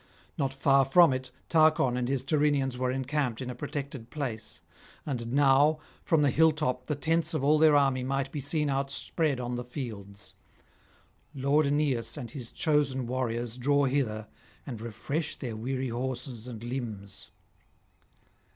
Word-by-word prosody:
Not 135 -3 -1
far 135 0 +4
from 150 +2 +6
it 130 0 -4 0.2
Tarchon 155 -6 +4
and 125 0 -1
his 135 -2 0
Tyrrhenians 145 -3 +1
were 130 0 -1
encamped 130 -2 -1
in 125 -1 -4
a - - -5
protected 140 -2 -6
place; 120 -7 -5 0.4
and 120 -5 -3
now 140 +2 +4 0.3
from 160 -3 +3
the 140 - +3
hill 160 +4 +5
top 125 -5 -2
the 150 - 0
tents 165 +3 0
of 145 - -1
all 150 +2 +4
their 155 -1 +6
army 135 -3 +3
might 135 +1 -1
be 150 - -4
seen 150 +2 0
outspread 140 +1 -1
on 120 0 -3
the 125 - -4
fields. 110 -6 -8 1.0
Lord 140 +3 +2
Aeneas 140 -3 0
and 120 -6 -6
his 125 -4 -7
chosen 145 -4 +1
warriors 120 -1 -2
draw 140 +2 +3
hither 125 -6 -1 0.4
and 120 -5 -6
refresh 140 +8 -3
their 120 -5 -5
weary 130 +3 -3
horses 125 -1 -4
and 115 -3 -8
limbs. 110 -6 -6
135 Hz, 155 wpm, -29 LUFS, 120-145 Hz, 1.0 s, from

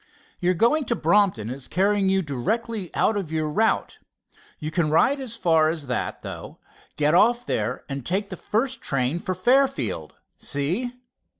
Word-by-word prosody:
Your 180 0 +1
going 255 - +3
to 235 - 0
Brompton 170 - +2
is 130 0 -6
carrying 195 +1 +2
you 190 0 +2
directly 205 - -2
out 220 - +2
of 190 -6 -3
your 155 -1 0
route, 215 +9 0 0.6
you 155 0 -5
can 160 -1 +1
ride 240 - +3
as 250 -4 -5
far 165 -7 +3
as 160 -3 -4
that, 125 -2 -3
though, - - -8 0.4
get 150 +1 +2
off 235 +7 +4
there 115 - -2
and 140 -1 -5
take 195 - -1
the 185 - -5
first 250 +9 -2
train 135 +4 -1
for 185 +1 -3
Fairfield, 265 +8 +1 0.2
see?" 175 - -1
185 Hz, 165 wpm, -24 LUFS, 150-225 Hz, 0.6 s, off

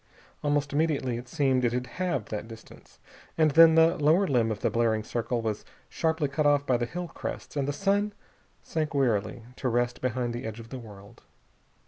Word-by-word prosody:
Almost 145 -1 0
immediately, 145 -5 0
it 125 - -11
seemed, 135 -3 +1
it 120 -1 +1
had 125 0 -1
halved 170 - -3
that 105 0 -4
distance. 115 -1 -14 0.4
And 155 -2 +4
then 160 +2 +7
the 165 +1 +5
lower 155 +6 +4
limb 120 -8 +1
of 105 - -4
the - - +1
blaring 115 -2 +1
circle 120 +1 -2
was 110 -2 -2 0.3
sharply 160 -2 0
cut 145 +2 0
off 145 -1 +3
by 130 -3 +2
the 120 0 -2
hill 175 +7 -5
crests - - -7
and 140 -2 -1
the - - +1
sun 200 +5 0 0.5
sank 155 -2 -3
wearily 120 -3 0
to 130 - -1
rest 120 +1 0
behind 125 -1 -1
the 120 - -5
edge 110 0 -6
of 115 0 -11
the 130 - -6
world. 105 0 -13
130 Hz, 195 wpm, -27 LUFS, 115-155 Hz, 0.5 s, then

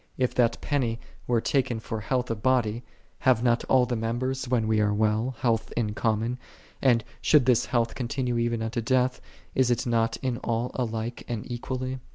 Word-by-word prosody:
If 125 -1 +1
that 120 -2 +2
penny 120 -6 0 0.3
were 120 -2 +2
taken 125 -4 0
for 110 0 -5
health 125 +2 -1
of 110 -2 -4
body, 120 -2 +1 0.4
have 125 -3 +3
not 120 -1 +2
all 130 -2 +4
the 125 0 -2
members, 125 +4 -2
when 120 -3 +1
we 110 -1 +2
are 105 0 +2
well, 110 +4 +1
health 115 -3 +1
in 110 -3 0
com 110 0 0
mon; 120 +3 -3 0.4
and, 120 -4 +4 0.2
should 150 -5 +5
this 125 -2 +3
health 115 -2 +1
continue 125 0 -2
even 115 -1 0
unto 115 +2 -2
death, 125 +2 +1 0.3
is 130 -2 +3
it 120 +2 +1
not 115 -1 +1
in 125 -2 0
all 120 0 -2
alike 115 -1 -3
and 115 -3 -4
equally? 130 +2 -3
120 Hz, 190 wpm, -27 LUFS, 115-125 Hz, 0.4 s, should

